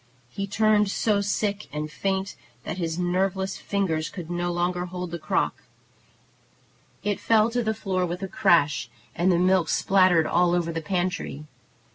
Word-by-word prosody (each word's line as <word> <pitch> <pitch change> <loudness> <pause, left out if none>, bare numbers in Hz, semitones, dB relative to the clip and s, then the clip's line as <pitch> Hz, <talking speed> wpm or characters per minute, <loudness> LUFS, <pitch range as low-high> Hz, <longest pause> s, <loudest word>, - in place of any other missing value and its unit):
He 195 +6 -4
turned 210 0 +3
so 205 0 +1
sick 200 0 -1
and 150 +1 -4
faint 195 +2 -2 0.3
that 180 - -5
his 165 -1 -2
nerveless 190 +2 0
fingers 165 -6 -1
could 175 -3 -8
no 175 0 -1
longer 175 +1 -1
hold 180 -1 -6
the 170 - -4
crock. - - -1 1.4
It 205 -1 -1
fell 225 0 +3
to 245 +1 0
the 220 -1 -1
floor 190 -4 -1
with 180 +3 -5
a - - -2
crash, 150 -8 +2 0.3
and 180 +2 +2
the 175 - +3
milk 185 -1 +3
spattered 185 -4 +4
all 175 0 +2
over 170 -1 0
the 165 0 -3
pantry. 175 -3 -2
180 Hz, 160 wpm, -25 LUFS, 170-195 Hz, 1.4 s, spattered